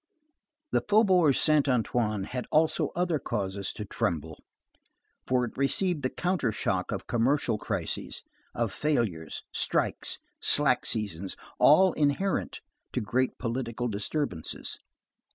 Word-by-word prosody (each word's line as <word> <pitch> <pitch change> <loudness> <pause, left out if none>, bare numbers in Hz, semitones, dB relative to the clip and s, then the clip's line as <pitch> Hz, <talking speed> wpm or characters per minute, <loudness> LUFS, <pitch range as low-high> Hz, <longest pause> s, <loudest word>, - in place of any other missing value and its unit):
The - - +2
Faubourg 190 - +4
Saint 150 -2 +3
Antoine 115 -4 0
had 125 +5 -5
also 155 0 +2
other 175 -3 0
causes 100 -5 -3
to 105 - -6
tremble; 80 -5 -3 0.9
for 125 -1 +2
it 120 - -9
received 155 +4 +1
the 130 - 0
counter 175 -9 -1
shock 105 - -2
of - - -4
commercial 120 -1 +1
crises, 95 -7 -4 0.3
of 115 -4 -1
failures, 110 - -1
strikes, - - +1 0.2
slack 140 -4 +5
seasons, 100 -4 -2 0.2
all 185 +5 +6
inherent 155 +6 0 0.3
to - - -1
great 125 +5 0
political 120 0 -3
disturbances. 105 - -3
125 Hz, 115 wpm, -28 LUFS, 105-150 Hz, 0.9 s, all